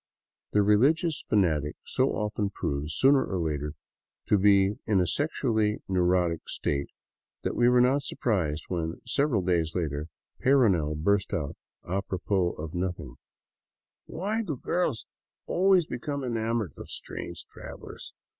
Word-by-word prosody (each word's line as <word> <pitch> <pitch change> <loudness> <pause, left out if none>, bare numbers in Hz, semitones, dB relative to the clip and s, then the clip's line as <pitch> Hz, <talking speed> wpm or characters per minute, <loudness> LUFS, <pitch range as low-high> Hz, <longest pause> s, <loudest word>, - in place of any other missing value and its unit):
The 105 - +4
religious 145 - +3
fanatic 80 -8 +2
so - - +1
often 105 -1 -1
proves, 75 -5 -3
sooner 135 0 +5
or 95 - -3
later, 75 -3 -2 0.6
to 105 - +4
be 100 0 +4
in 105 -4 +3
a 90 - +3
sexually 110 - 0
neurotic 90 -2 +1
state 70 -1 -2 0.5
that - - -2
we 120 0 +4
were 125 0 +5
not 130 +3 +3
surprised 85 - -1
when, 85 -2 -3
several 140 -9 +1
days 85 -3 0
later, 75 -3 -2 0.3
Peyrounel 100 - +3
burst 100 +6 +1
out, 70 -4 -3 0.3
apropos 95 -1 -1
of 80 +1 -7
nothing: 90 -9 -4 0.9
"Why 210 +7 -2
do 155 - -4
girls 165 -5 -1 0.4
always 185 -1 +3
become 140 +2 -4
enamored 115 - -1
of - - -9
strange - - -6
travelers? - - -9
100 Hz, 130 wpm, -28 LUFS, 85-125 Hz, 0.9 s, sooner